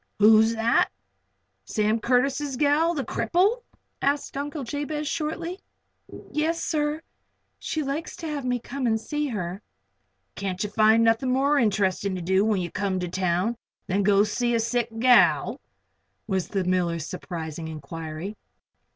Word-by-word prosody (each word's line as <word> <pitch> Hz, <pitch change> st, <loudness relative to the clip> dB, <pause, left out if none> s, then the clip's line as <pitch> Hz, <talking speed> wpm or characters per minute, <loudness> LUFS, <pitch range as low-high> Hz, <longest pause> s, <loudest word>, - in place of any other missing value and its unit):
"Who's 220 Hz, +2 st, +6 dB
that? 225 Hz, +1 st, +3 dB, 0.8 s
Sam 215 Hz, +1 st, +1 dB
Curtis' 270 Hz, +4 st, +1 dB
gal 300 Hz, +5 st, +2 dB
the 280 Hz, -, -1 dB
cripple?" 405 Hz, +8 st, +1 dB, 0.4 s
asked 285 Hz, 0 st, 0 dB
Uncle 290 Hz, +1 st, -4 dB
Jabez, 295 Hz, +3 st, -3 dB
shortly. 335 Hz, +5 st, -3 dB, 0.7 s
"Yes, 320 Hz, +2 st, 0 dB
sir. 300 Hz, 0 st, -1 dB, 0.6 s
She 310 Hz, -, -2 dB
likes 280 Hz, +4 st, -4 dB
to 330 Hz, -, -8 dB
have 295 Hz, -3 st, -3 dB
me 250 Hz, -1 st, 0 dB
come 255 Hz, +2 st, -4 dB
and 220 Hz, -1 st, +2 dB
see 295 Hz, +5 st, -2 dB
her." 190 Hz, -5 st, -4 dB, 0.7 s
"Can't 190 Hz, -1 st, -3 dB
you 210 Hz, -, -4 dB
find 220 Hz, +1 st, +5 dB
nothing 230 Hz, +3 st, +2 dB
more 280 Hz, +3 st, +3 dB
interestin' 200 Hz, -4 st, +1 dB
to 180 Hz, -, -4 dB
do 190 Hz, +3 st, +3 dB
when 210 Hz, -3 st, +1 dB
ye 175 Hz, -2 st, -4 dB
come 195 Hz, -2 st, -1 dB
to 180 Hz, -, -2 dB
town 185 Hz, +5 st, 0 dB, 0.3 s
than 195 Hz, +2 st, 0 dB
go 200 Hz, 0 st, +4 dB
to -, -, +1 dB
see 240 Hz, +2 st, 0 dB
a -, -, +2 dB
sick 235 Hz, +1 st, 0 dB
gal?" 225 Hz, -, +4 dB, 0.6 s
was 190 Hz, -4 st, -1 dB
the 195 Hz, -2 st, -1 dB
miller's 175 Hz, -3 st, 0 dB
surprising 165 Hz, -3 st, -6 dB
inquiry. 160 Hz, +5 st, -6 dB
225 Hz, 150 wpm, -25 LUFS, 190-285 Hz, 0.8 s, Who's